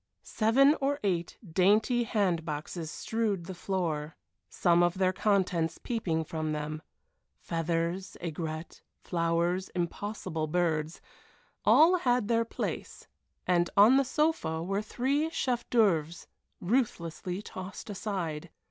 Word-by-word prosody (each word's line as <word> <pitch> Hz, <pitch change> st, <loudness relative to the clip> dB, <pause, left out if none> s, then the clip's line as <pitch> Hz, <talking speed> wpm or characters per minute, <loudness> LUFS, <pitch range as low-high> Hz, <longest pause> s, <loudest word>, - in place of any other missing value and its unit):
Seven 270 Hz, +7 st, +4 dB
or 285 Hz, +1 st, 0 dB
eight 175 Hz, -4 st, -1 dB
dainty 210 Hz, +8 st, +3 dB
bandboxes 170 Hz, -6 st, -2 dB
strewed 210 Hz, -2 st, -2 dB
the 190 Hz, -, -6 dB
floor, 165 Hz, -5 st, -3 dB, 0.3 s
some 175 Hz, -1 st, +3 dB
of 175 Hz, +1 st, +2 dB
their 185 Hz, -1 st, +2 dB
contents 180 Hz, -5 st, +1 dB
peeping 175 Hz, -9 st, -2 dB
from 155 Hz, 0 st, -3 dB
them 155 Hz, +1 st, -4 dB, 0.6 s
feathers, 170 Hz, +3 st, -2 dB
aigrettes, 160 Hz, -1 st, -5 dB, 0.2 s
flowers, 170 Hz, +2 st, 0 dB
impossible 175 Hz, -2 st, -3 dB
birds 160 Hz, -1 st, -1 dB, 0.6 s
all 340 Hz, +4 st, +6 dB
had 245 Hz, -, +1 dB
their 230 Hz, 0 st, +2 dB
place, -, -, -5 dB, 0.4 s
and 175 Hz, -1 st, +2 dB
on 220 Hz, +6 st, +8 dB
the 275 Hz, -, +4 dB
sofa 255 Hz, -, 0 dB
were 195 Hz, +3 st, -1 dB
three 275 Hz, +8 st, 0 dB
chef 250 Hz, -6 st, -2 dB
d'oeuvres 170 Hz, -8 st, +2 dB, 0.3 s
ruthlessly 185 Hz, -4 st, -1 dB
tossed 185 Hz, -1 st, -8 dB
aside. 180 Hz, -6 st, -4 dB
180 Hz, 110 wpm, -29 LUFS, 165-220 Hz, 0.6 s, on